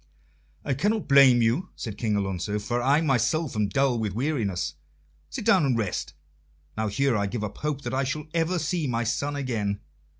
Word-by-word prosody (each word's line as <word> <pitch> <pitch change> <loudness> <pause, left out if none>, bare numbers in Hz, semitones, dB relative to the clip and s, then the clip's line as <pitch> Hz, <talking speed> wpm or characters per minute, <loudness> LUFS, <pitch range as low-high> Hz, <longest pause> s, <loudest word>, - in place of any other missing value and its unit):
"I 140 - +1
cannot 205 - 0
blame 135 -4 +7
you," 125 +12 +1
said 110 -5 -5
King 110 -3 0
Alonso, 100 0 -1
"for 120 +4 -2
I 140 +5 +3
myself 135 +1 +1
am 105 -1 +1
dull 125 +4 +1
with 105 -3 -2
weariness. 110 - -1 0.6
Sit 70 - -5
down - - +5
and 130 -4 +2
rest. 105 -5 -3 0.6
Now 110 0 -1
here 130 +5 +1
I 100 -1 0
give 105 +1 -4
up 105 -1 -6
hope 150 -2 -2
that - - -5
I 135 +1 +1
shall 140 +3 -3
ever 170 +2 +1
see 165 -1 -1
my 120 -2 0
son 130 +6 -1
again. 110 -8 -2
120 Hz, 190 wpm, -26 LUFS, 105-145 Hz, 0.6 s, blame